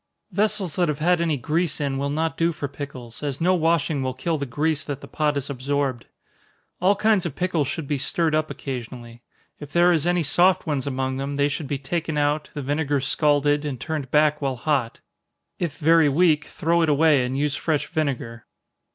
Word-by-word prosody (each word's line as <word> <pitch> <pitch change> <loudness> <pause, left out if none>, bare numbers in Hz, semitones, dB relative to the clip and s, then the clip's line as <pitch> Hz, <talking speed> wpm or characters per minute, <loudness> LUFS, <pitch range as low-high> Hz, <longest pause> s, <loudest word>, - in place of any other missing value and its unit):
Vessels 195 -3 0
that 175 -1 +2
have 150 -2 -1
had 175 +3 +2
any 160 -3 +1
grease 155 +5 -1
in 140 -2 -1
will 140 +1 -1
not 160 +2 -1
do 165 +1 +1
for 145 -3 -4
pickles, 130 -5 -8
as 145 -2 -3
no 180 +3 +3
washing 165 -4 +1
will 130 -1 -2
kill 160 +4 -2
the 140 - -3
grease 150 +4 0
that 140 -2 -5
the - - -11
pot 150 -1 0
has 140 -1 -3
absorbed. 135 -2 -2 0.7
All 190 +3 +4
kinds 210 -2 +2
of 150 - -7
pickles 170 -6 0
should 160 +2 -4
be 145 -1 -1
stirred 160 +3 0
up 155 0 +1
occasionally. 120 -2 -7 0.4
If 145 -1 -9
there 175 +2 +4
is 165 -1 +1
any 175 -1 +2
soft 175 +5 +3
ones 145 -4 -2
among 130 -1 -2
them, 140 +1 -3
they 140 0 +2
should 145 0 -4
be 140 - -2
taken 160 +3 -3
out, 145 +1 0
the 145 - -4
vinegar 145 +1 0
scalded, 145 +1 +2
and 140 -5 -4
turned 150 -2 -4
back 150 +1 +3
while 135 -2 -1
hot 125 -2 -1 0.6
if 165 -5 -3
very 160 0 +4
weak, 160 +1 +3
throw 170 +2 0
it 165 - +2
away, 150 -2 +4
and 125 +2 -2
use 145 0 0
fresh 150 -2 -1
vinegar. 135 -8 -3
150 Hz, 205 wpm, -23 LUFS, 140-165 Hz, 0.7 s, All